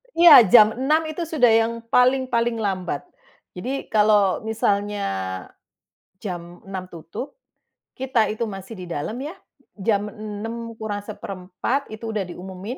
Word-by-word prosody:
Iya 330 -7 +10
Jam 215 -3 +9
6:00 285 +6 +2
itu 315 +2 -4
sudah 310 -6 +3
yang 225 +1 +3
paling, 255 +2 +3
paling 235 -2 0
lambat. 185 -7 -2 0.5
Jadi 255 +9 -4
kalau 210 -3 +3
misalnya 205 -2 0 1.2
jam 175 -3 -7
6:00 190 -2 -6
tutup, 170 - -8 0.6
kita 255 -4 +1
itu 220 +2 -2
masih 195 +1 -8
di 185 - -7
dalam 170 +8 -4
ya, 300 +4 -5 0.4
jam 205 0 +1
6:00 225 +2 -6
kurang 210 -2 -4
1/4 200 +5 -4
itu 220 +1 -7
udah 210 -2 -1
diumumin 190 +7 -7
215 Hz, 130 wpm, -23 LUFS, 195-240 Hz, 1.2 s, Iya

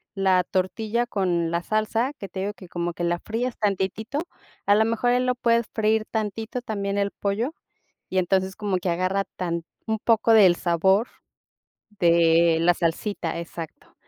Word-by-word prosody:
la 190 -2 +3
tortilla 215 +5 -1
con 175 -6 0
la 170 0 0
salsa, 220 +6 0
que 255 -9 -9
te 190 - -6
digo 205 +2 -2
que 185 -4 -14
como 175 0 -3
que 175 - -5
la 175 0 0
fríes 235 +5 -3
tantitito, 210 +5 -1 0.5
a 205 - +5
lo 220 +1 +4
mejor, 230 +2 +1
eh, 245 - +3
lo 250 0 +1
puedes 235 -2 +2
freír 220 0 +1
tantito 220 +2 -3
también 200 -3 -3
el 200 0 0
pollo 220 +9 -2 0.6
y 185 - +1
entonces 190 +1 0
como 205 -3 -1
que 180 0 -2
agarra 185 +3 0
tan 170 -2 -2 0.2
un 220 - 0
poco 225 0 +3
del 190 -5 +7
sabor 190 +7 +2 0.8
de 170 -3 +4
la 175 +1 +5
salsita, 170 0 -2
exacto. 170 -1 -9
200 Hz, 165 wpm, -24 LUFS, 175-220 Hz, 0.8 s, del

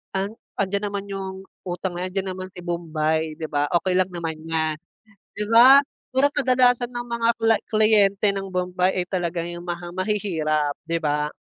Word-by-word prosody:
an 195 +2 -1 0.2
andiyan 200 +1 -1
naman 200 -1 -4
'yung 190 -1 -6 0.2
utang, 175 0 -3
eh, 185 - -2
andiyan 190 0 -2
naman 185 0 -6
si 180 - -8
bombay 160 -2 -1
di 160 0 -5
ba, 145 0 +1 0.2
okey 185 -1 +1
lang 185 - +2
naman 165 -2 -4
'yan, 160 -1 0 0.5
di 210 0 -4
ba? 245 +5 +8 0.3
Pero 265 +2 +4
kadalasan 250 -3 +2
ng 240 0 -5
mga 235 -1 -1
kla 225 -1 +4 0.2
kliyente 215 -1 +4
ng 195 -1 -5
bombay 180 0 0
ay 180 - -1
talagang 175 -2 -2
'yung 175 0 -6
mga 175 0 -6
mahihirap, 160 -7 -1
di 165 +1 -1
ba? 150 -1 -1
185 Hz, 175 wpm, -23 LUFS, 165-210 Hz, 0.5 s, ba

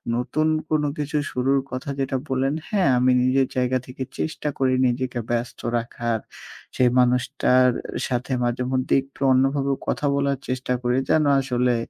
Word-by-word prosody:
নতুন 150 +6 0 0.2
কোনো 150 -1 +1
কিছু 150 +1 -2
শুরুর 135 +2 +1
কথা 130 +2 -5
যেটা 135 0 0
বললেন। 135 +1 0 0.2
হ্যাঁ, 195 -9 +2
আমি 125 +1 +3
নিজের 130 +1 +2
জায়গা 125 0 +2
থেকে 130 +1 -6 0.2
চেষ্টা 155 -1 -3
করি, 130 -1 +2
নিজেকে 125 0 -2
ব্যস্ত 120 0 -2 0.2
রাখার। 115 -1 -2 0.6
সেই 125 -1 +4
মানুষটার 125 +1 +3 0.4
সাথে 125 +1 -3
মাঝেমধ্যেই 125 +2 +1
একটু 135 +1 -21
অন্যভাবেও 135 +1 +2
কথা - - -1
বলার 140 -1 0
চেষ্টা 130 0 -1
করি। 125 +1 +1
যেন 155 - +4 0.2
আসলে 125 -2 +1
130 Hz, 145 wpm, -23 LUFS, 125-135 Hz, 0.6 s, সেই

